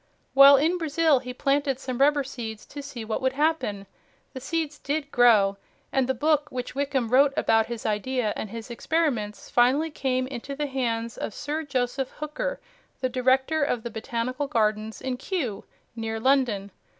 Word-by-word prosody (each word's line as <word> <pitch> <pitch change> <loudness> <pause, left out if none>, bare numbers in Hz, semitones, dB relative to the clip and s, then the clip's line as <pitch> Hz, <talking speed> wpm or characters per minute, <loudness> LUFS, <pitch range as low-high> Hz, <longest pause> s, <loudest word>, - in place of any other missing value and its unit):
While 275 +1 +9
in 330 +6 +1
Brazil 315 -2 +3
he 250 0 -7
planted 275 +1 0
some 255 -2 -5
rubber 285 +1 +4
seeds 230 -5 -7
to 290 - -8
see 265 -5 -7
what 220 - -2
would 260 0 +1
happen. 285 -9 0 0.5
The 260 - -6
seeds 295 +2 -3
DID 285 0 -3
grow, 210 -5 +5 0.3
and 265 -2 +1
the 265 - +1
book 300 +3 +1
which 250 -3 -5
Wickham 270 -3 -1
wrote 275 +3 +5
about 225 0 +3
his 235 -2 -6
idea 220 +1 0
and 215 - -5
his 230 +2 -8
experiments 240 -6 -1
finally 270 +7 +3
came 255 -3 -1
into 265 +1 -6
the 295 +1 -2
hands 235 -4 -2
of - - -4
Sir 300 +2 -3
Joseph 265 -2 -2
Hooker, - - -4 0.4
the 255 - 0
Director 260 +5 +2
of 245 -5 -1
the 235 - -5
Botanical 235 +5 -3
Gardens 215 -4 0
in 260 -1 -3
Kew, 260 - -3 0.3
near 225 -1 -3
London. 230 -6 +1
260 Hz, 170 wpm, -26 LUFS, 230-285 Hz, 0.5 s, While